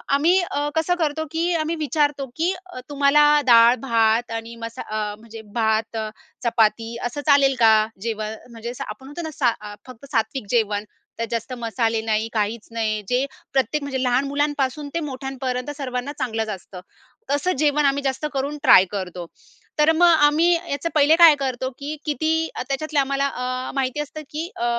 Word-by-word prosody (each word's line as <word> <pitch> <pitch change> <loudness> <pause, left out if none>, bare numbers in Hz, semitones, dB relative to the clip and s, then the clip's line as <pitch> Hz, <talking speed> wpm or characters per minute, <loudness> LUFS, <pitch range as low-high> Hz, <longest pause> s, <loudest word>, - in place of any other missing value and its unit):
आम्ही 340 +6 +4
अ, 290 -4 -2
कसं 325 +3 +1
करतो? 315 0 -1
की 335 +2 0
आम्ही 320 +1 -1
विचारतो, 295 -2 0
की 345 +4 +1
अ, 360 -8 -9
तुम्हाला 285 +1 +4 0.2
डाळ-भात 230 -1 +4
आणि 230 +1 -5
मसा 230 - -7
अ, 210 -1 -3
म्हणजे 225 0 -11
भात, 220 0 0 0.5
चपाती 230 0 +1
असं 290 +5 -6
चालेल 275 -2 +5
का 225 -1 +6 0.3
जेवण? 220 -1 -3 0.2
म्हणजे, 230 +1 -7
असं 265 +2 -6
आपण 210 +5 -9
म्हणतो 295 +4 -7
ना, 315 - -5
सा 240 -5 +2
अ, 210 0 -8
फक्त 255 +2 -12
सात्विक 225 -1 -1
जेवण. 210 -3 +1 0.3
त्यात 230 0 -2
जास्त 230 +2 -3
मसाले 230 -1 -1
नाही, 220 0 0
काहीच 215 +1 -2
नाही 215 -2 -1
जे 250 +2 +2 0.3
प्रत्येक 280 +3 +1
म्हणजे 265 -2 -3
लहान 250 +2 +2
मुलांपासून 285 0 -1
ते - - +1
मोठ्यांपर्यंत 260 -1 -4
सर्वांना 255 0 -3
चांगलंच 225 -4 -2
असतं. 185 -2 -8 0.5
तसं 290 +6 +1
जेवण 295 -1 +2
आम्ही 280 0 +1
जास्त 270 +2 -2
करून 280 +2 -2
ट्राय 190 -9 +8
करतो. 180 -3 -5 0.5
तर 305 +2 +5
मग 350 +2 +5 0.2
आम्ही 330 +4 +3 0.2
याचं 310 +4 -2
पहिले 300 +2 +5
काय 330 -3 +8
करतो, 260 -1 -2
की 295 +2 -4
किती 315 +3 0
अ, - - -3
त्याच्यातले 295 +2 -1
आम्हाला 275 0 +1
अ, 255 -1 -4
माहिती 270 +2 -1
असतं, 305 +1 -7
की 320 +4 -4
अ, 235 - -2
265 Hz, 170 wpm, -22 LUFS, 230-295 Hz, 0.5 s, ट्राय